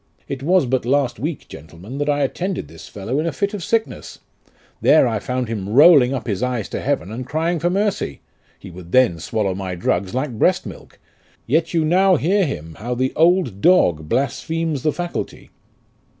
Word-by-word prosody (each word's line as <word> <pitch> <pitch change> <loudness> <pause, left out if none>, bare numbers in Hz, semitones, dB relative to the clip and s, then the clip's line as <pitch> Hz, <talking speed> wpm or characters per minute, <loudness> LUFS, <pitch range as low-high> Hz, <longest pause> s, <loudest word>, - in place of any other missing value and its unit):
It 135 -1 -5
was 175 +2 +3
but 130 +1 0
last 135 +1 0
week, 155 0 -4
gentlemen, 90 - -10
that 145 0 -1
I 145 0 +1
attended 180 +7 -3
this - - -13
fellow 110 +7 -4
in 160 - -1
a - - 0
fit 200 +4 -2
of 200 -4 -5
sickness; 225 +6 -2 0.6
there 155 - +5
I 110 -2 -1
found 125 +3 -3
him 105 -4 -4
rolling 140 +1 +6
up 130 -4 -3
his 100 -1 -3
eyes 125 -4 -2
to - - -4
heaven 135 -8 -2
and 120 +3 -5
crying 160 +6 -1
for 175 - 0
mercy: 195 - -1 0.4
he - - -12
would 85 0 -12
then 125 -10 +4
swallow 105 +1 -2
my 95 -1 -5
drugs 90 +3 -1
like 130 +1 -1
breast 185 0 +2
milk; - - -11 0.5
yet 160 +6 0
you 160 -2 +2
now 185 +3 +4
hear 185 +6 +2
him, 80 - -6
how 120 +4 -3
the 130 +2 -1
old 165 - +2
dog 85 - +3
blasphemes 155 +3 -1
the 155 - +1
faculty." 175 +3 -6
135 Hz, 190 wpm, -20 LUFS, 110-165 Hz, 0.6 s, rolling